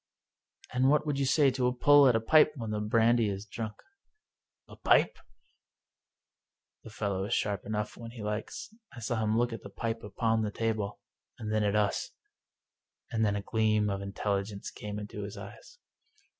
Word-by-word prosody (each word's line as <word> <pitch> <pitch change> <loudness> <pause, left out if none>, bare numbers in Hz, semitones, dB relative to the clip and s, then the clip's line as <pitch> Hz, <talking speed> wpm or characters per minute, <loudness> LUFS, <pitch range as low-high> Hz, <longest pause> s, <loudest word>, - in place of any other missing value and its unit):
" - - -23
And 130 +1 +3
what 150 +1 +3
would 145 -2 -1
you 135 - +1
say 140 0 +4
to 125 -1 0
a 125 - +1
pull 145 +2 +6
at 125 - +4
a - - +4
pipe 150 +6 +5
when 115 -5 -5
the 105 - -1
brandy 115 +1 +3
is 100 +1 -4
drunk! 110 0 -5 0.4
" 430 0 -54
" - - -61
A - - -12
pipe? - - +3 0.8
" - - -60
The - - -10
fellow 100 -3 -2
is 110 - 0
sharp 100 -2 -1
enough 105 0 -3
when 115 -1 -8
he 115 -2 -9
likes. 105 - -4 0.2
I 125 - -9
saw 115 0 -2
him 110 +1 +1
look 120 0 +1
at 115 - -6
the - - -9
pipe 115 +3 -3
upon 110 +2 0
the 105 - -1
table, 110 -1 -2 0.4
and 110 -1 -4
then 110 -1 +2
at 105 0 +1
us, 105 -2 +1 1.0
and 110 -1 +1
then 105 -2 +2
a 100 - -3
gleam 110 -1 +1
of 100 0 -3
intelligence 100 0 -3
came 105 0 -6
into 105 0 -6
his 100 +1 -6
eyes. 485 - -11
110 Hz, 200 wpm, -30 LUFS, 105-120 Hz, 1.0 s, pull